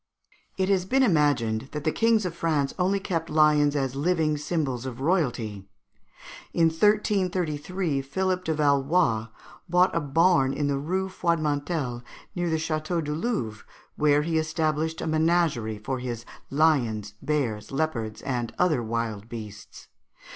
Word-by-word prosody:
It 190 Hz, -1 st, +1 dB
has 190 Hz, -2 st, +2 dB
been 265 Hz, +7 st, +3 dB
imagined 140 Hz, -, +2 dB
that 150 Hz, -1 st, -4 dB
the 155 Hz, -, +1 dB
kings 225 Hz, 0 st, +2 dB
of 180 Hz, -, -2 dB
France 155 Hz, -5 st, 0 dB
only 190 Hz, +2 st, +2 dB
kept 165 Hz, -4 st, -3 dB
lions 150 Hz, -1 st, +4 dB
as 135 Hz, -3 st, -1 dB
living 155 Hz, 0 st, +1 dB
symbols 145 Hz, -5 st, -2 dB
of 125 Hz, -1 st, -7 dB
royalty. 120 Hz, -, -1 dB, 0.8 s
In 165 Hz, -1 st, +4 dB
1333 180 Hz, -4 st, 0 dB
Philippe 185 Hz, +7 st, -1 dB
de 160 Hz, -3 st, -1 dB
Valois 140 Hz, -5 st, +2 dB, 0.4 s
bought 180 Hz, +2 st, +3 dB
a -, -, +3 dB
barn 145 Hz, -1 st, +3 dB
in 145 Hz, +1 st, -1 dB
the 140 Hz, -1 st, 0 dB
Rue 185 Hz, +6 st, -1 dB
Froidmantel, 155 Hz, -7 st, -1 dB, 0.3 s
near 175 Hz, -1 st, -1 dB
the 160 Hz, -, +1 dB
Château 160 Hz, +1 st, -2 dB
du 150 Hz, 0 st, -3 dB
Louvre, 150 Hz, -, -2 dB, 0.3 s
where 150 Hz, 0 st, +3 dB
he 160 Hz, 0 st, +1 dB
established 155 Hz, 0 st, -1 dB
a -, -, -3 dB
menagerie 155 Hz, -8 st, +1 dB
for 130 Hz, +5 st, -4 dB
his 120 Hz, -2 st, -5 dB, 0.2 s
lions, 120 Hz, -9 st, +1 dB
bears, 120 Hz, -9 st, -2 dB
leopards, 125 Hz, -8 st, -2 dB
and 120 Hz, -4 st, -3 dB
other 160 Hz, -8 st, +2 dB
wild 115 Hz, -2 st, -3 dB
beasts. 105 Hz, -3 st, -9 dB
150 Hz, 140 wpm, -26 LUFS, 130-170 Hz, 0.8 s, lions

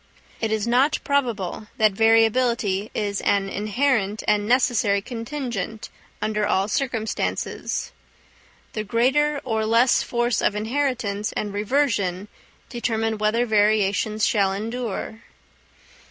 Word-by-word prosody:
It 225 Hz, -1 st, -1 dB
is 220 Hz, -2 st, 0 dB
not 255 Hz, +5 st, +3 dB
probable 230 Hz, -, -1 dB
that 215 Hz, -1 st, +4 dB
variability 225 Hz, -1 st, +2 dB
is 205 Hz, -1 st, -2 dB
an 195 Hz, -1 st, +1 dB
inherent 215 Hz, 0 st, 0 dB
and 210 Hz, 0 st, +2 dB
necessary 235 Hz, -5 st, +2 dB
contingent, 230 Hz, -2 st, -5 dB, 0.3 s
under 210 Hz, -1 st, 0 dB
all 195 Hz, 0 st, +1 dB
circumstances. 225 Hz, -1 st, -2 dB, 0.8 s
The 215 Hz, -, -3 dB
greater 270 Hz, +7 st, +2 dB
or 220 Hz, -3 st, -1 dB
less 230 Hz, +3 st, +3 dB
force 240 Hz, -2 st, 0 dB
of 205 Hz, -, +1 dB
inheritance 220 Hz, -3 st, -1 dB
and 205 Hz, -1 st, -3 dB
reversion 205 Hz, -4 st, 0 dB, 0.4 s
determine 225 Hz, -3 st, -2 dB
whether 215 Hz, +3 st, +1 dB
variations 210 Hz, 0 st, +2 dB
shall 195 Hz, -3 st, +2 dB
endure. 225 Hz, +1 st, -4 dB
220 Hz, 110 wpm, -23 LUFS, 205-245 Hz, 0.8 s, that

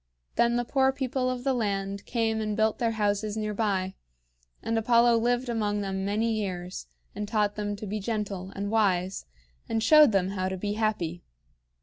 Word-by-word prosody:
Then 235 Hz, 0 st, +3 dB
the 240 Hz, 0 st, 0 dB
poor 265 Hz, +1 st, +3 dB
people 260 Hz, -1 st, -1 dB
of 250 Hz, -1 st, -3 dB
the 270 Hz, 0 st, +2 dB
land 200 Hz, -4 st, -2 dB
came 225 Hz, -2 st, 0 dB
and 215 Hz, -1 st, -2 dB
built 220 Hz, 0 st, +1 dB
their 230 Hz, -1 st, +1 dB
houses 210 Hz, 0 st, 0 dB
near 215 Hz, -1 st, -2 dB
by; 195 Hz, -3 st, 0 dB, 0.7 s
and 225 Hz, -, -1 dB
Apollo 235 Hz, +1 st, +4 dB
lived 245 Hz, +2 st, +1 dB
among 210 Hz, -3 st, -1 dB
them 190 Hz, -1 st, -3 dB
many 215 Hz, +3 st, 0 dB
years, 185 Hz, -4 st, -4 dB, 0.3 s
and 210 Hz, +1 st, -4 dB
taught 210 Hz, -1 st, +1 dB
them 205 Hz, -1 st, -2 dB
to 210 Hz, -, -7 dB
be 210 Hz, +2 st, -3 dB
gentle 200 Hz, -3 st, -3 dB
and 200 Hz, +1 st, -3 dB
wise, 190 Hz, -, +1 dB, 0.4 s
and 225 Hz, -1 st, 0 dB
showed 305 Hz, +1 st, +7 dB
them 190 Hz, -2 st, +1 dB
how 185 Hz, -1 st, -2 dB
to 190 Hz, -, -4 dB
be 205 Hz, +2 st, -2 dB
happy. 205 Hz, -6 st, -1 dB
215 Hz, 185 wpm, -27 LUFS, 200-230 Hz, 0.7 s, showed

